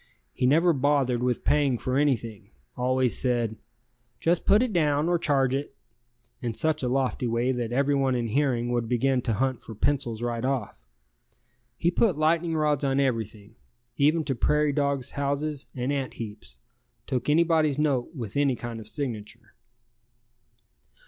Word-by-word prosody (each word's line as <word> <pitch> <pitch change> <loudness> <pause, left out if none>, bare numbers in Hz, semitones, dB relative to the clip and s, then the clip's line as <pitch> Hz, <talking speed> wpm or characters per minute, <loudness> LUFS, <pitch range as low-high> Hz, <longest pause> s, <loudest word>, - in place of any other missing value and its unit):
He 125 - 0
never 165 +5 +4
bothered 135 -3 +1
with 125 -1 -1
paying 145 -3 +2
for 130 +2 -3
anything, 115 -8 -1 0.3
always 130 0 +3
said, 120 -3 0 0.6
"Just 170 +1 +1
put 210 +4 +5
it 245 -4 -2
down, 150 -2 +2
or 175 -1 +2
charge 135 -4 +1
it," 135 0 -3 0.7
in 120 -2 -3
such 155 +3 +1
a 130 - -1
lofty 130 -1 0
way 120 +2 0
that 120 -2 -3
everyone 135 0 +1
in 120 -2 -2
hearing 120 -2 0
would 120 -2 -1
begin 125 +1 +1
to 115 - -1
hunt 130 +3 -1
for 110 - -10
pencils 120 -2 -1
right 120 -1 -2
off. 130 - -2 1.0
He 170 +6 +1
put 185 -3 +2
lightning 165 +2 +1
rods 150 -2 +1
on 135 0 +1
everything, 110 -5 -2 0.4
even 155 +4 +2
to 140 - -1
prairie 150 +4 +1
dogs' 140 -3 -1
houses 140 +1 -2
and 125 +2 -2
ant 135 -2 -3
heaps, 105 - -9 0.5
took 130 +2 -2
anybody's 160 -2 +3
note 150 0 0
with 115 -7 -6
any 140 -2 +2
kind 120 -1 -6
of 110 - -10
signature. 110 -5 -6
135 Hz, 155 wpm, -26 LUFS, 120-150 Hz, 1.0 s, put